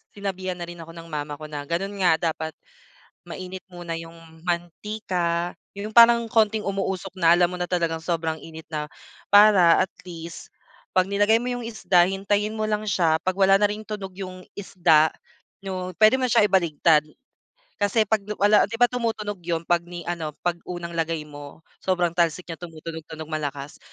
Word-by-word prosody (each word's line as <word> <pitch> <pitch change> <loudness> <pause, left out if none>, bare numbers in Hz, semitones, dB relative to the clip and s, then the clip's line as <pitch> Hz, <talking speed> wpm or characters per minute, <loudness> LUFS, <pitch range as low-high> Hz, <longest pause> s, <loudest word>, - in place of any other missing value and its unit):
sinabihan 190 -2 -4
na 175 - -5
rin 175 0 -10
ako 165 0 -10
ng 165 0 -10
mama 150 -1 -4
ko 155 - -7
na 150 -1 -5
gano'n 195 +4 -2
nga, 180 - +5 0.2
dapat 160 0 -5 0.8
mainit 185 0 -7
muna 175 -1 -6
yung 165 0 -10 0.3
mantika, 175 -1 -2 0.2
yung 210 +2 -4
parang 235 0 +7
konting 220 -1 +2
umuusok 195 -1 -3
na 170 -1 +5
alam 175 -1 +4
mo 180 - -7
na 180 - -1
talagang 170 -2 0
sobrang 165 -2 -1
init 160 0 -10
na, 150 -1 -5 0.4
para 205 -5 +7
at - - -44
least 170 -2 -9 0.4
'pag 185 0 +3
nilagay 205 +3 +3
mo 250 - -3
yung 245 -1 -3
isda, 195 -6 +3
hintayin 200 +3 0
mo 215 -1 -2
lang 210 0 0
siya, 170 -6 +2
'pag 185 - +1
wala 195 0 +6
na 205 - +2
ring 210 - -4
tunog 200 -3 -5
yung 185 -1 -7 0.2
isda, 170 -5 +4 0.6
'no? 185 -1 -4
Pwede 220 +4 +5
mo 255 - +2
na - - -3
siyang 210 - +5
ibaliktad 165 -4 +4 0.8
kasi 205 +2 +2
'pag 220 0 +3 0.2
wala 205 +1 +5
di 225 - -9
ba 245 - +6
tumutunog 225 -4 -2
yun 165 -1 -1
'pag 175 0 +2
ni 175 0 -7
ano, 160 -3 -4
'pag 175 -1 0
unang 175 -1 -6
lagay 165 -1 -1
mo, 145 +1 -11 0.2
sobrang 180 -2 0
talsik 170 +1 0
niya, 165 - -6
tumutunog-tunog 160 -2 -8
malakas. 145 -2 -4
180 Hz, 180 wpm, -24 LUFS, 165-205 Hz, 0.8 s, parang